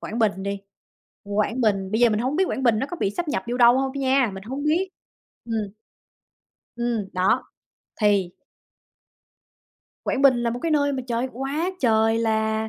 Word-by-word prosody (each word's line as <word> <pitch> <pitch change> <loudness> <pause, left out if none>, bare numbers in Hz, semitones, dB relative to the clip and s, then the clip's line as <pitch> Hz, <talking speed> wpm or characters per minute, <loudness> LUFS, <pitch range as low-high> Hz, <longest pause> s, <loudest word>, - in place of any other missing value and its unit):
Quảng 225 - -5
Bình 205 -4 +1
đi. 200 0 -3 0.6
Quảng 210 +4 -1
Bình, 200 -4 +1
bây 220 +2 0
giờ 240 -1 +5
mình 210 - 0
hông 260 +6 -1
biết 380 - +3
Quảng 265 - -3
Bình 235 -4 +3
nó 265 - -1
có 350 - -6
bị 195 - +1
sáp 340 +10 -4
nhập 295 - -1
vô 240 +1 -2
đâu 240 +1 +6
hông 270 0 -1
nha, 265 -3 +2
mình 190 - -8
hông 265 +7 -5
biết. 325 +6 +1 0.6
Ừm. 220 -3 -2 1.1
Ừm, 235 -4 -2
đó. 190 +7 +2 0.6
Thì 200 -4 +3 1.8
Quảng 270 - -1
Bình 255 -3 +5
là 235 - 0
một 240 - -4
cái 330 - 0
nơi 285 -2 +2
mà 265 -1 -3
trời, 235 +1 0
quá 280 +8 -2
trời 225 -2 +3
là 220 -1 0
235 Hz, 185 wpm, -24 LUFS, 215-270 Hz, 1.8 s, đâu